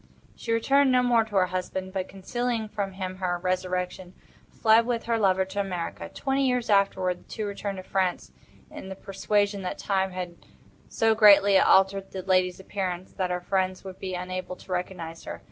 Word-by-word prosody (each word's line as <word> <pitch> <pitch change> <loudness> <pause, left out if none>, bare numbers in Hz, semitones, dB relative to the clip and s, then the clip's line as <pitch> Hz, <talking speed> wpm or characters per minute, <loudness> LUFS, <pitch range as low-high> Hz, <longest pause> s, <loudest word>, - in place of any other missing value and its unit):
She 230 - -5
returned 270 +4 +3
no 250 0 +4
more 240 -2 +4
to 215 -2 -9
her 185 -1 +5
husband, 185 +1 -4
but, 190 -1 -3
concealing 230 +4 -2
from 200 -2 -3
him 185 -1 -5
her 180 -2 -1
resurrection, 185 0 -3 0.3
fled 225 +1 +4
with 235 -2 -1
her 230 -1 0
lover 190 -2 +3
to 190 +2 -5
America. 180 -4 -4
Twenty 270 0 0
years 250 -3 0
afterward, 190 -2 +2
the - - -25
two 215 - -4
returned 200 -1 -4
to 185 - -7
France, 185 -2 -1 0.4
in 190 - -8
the 190 - -6
persuasion 200 +1 -1
that 185 - -4
time 190 -1 0
had 180 -2 -6 0.5
so 225 0 +2
greatly 205 -2 +7
altered 195 +1 +4
the 190 -1 -5
lady's 185 -1 +2
appearance 185 -2 -4
that 185 -2 -2
her 180 0 -2
friends 185 0 -1
would 190 -1 -9
be 185 -1 -4
unable 185 0 -5
to 185 - -14
recognize 180 -2 -4
her. - - -6
190 Hz, 185 wpm, -26 LUFS, 185-210 Hz, 0.5 s, greatly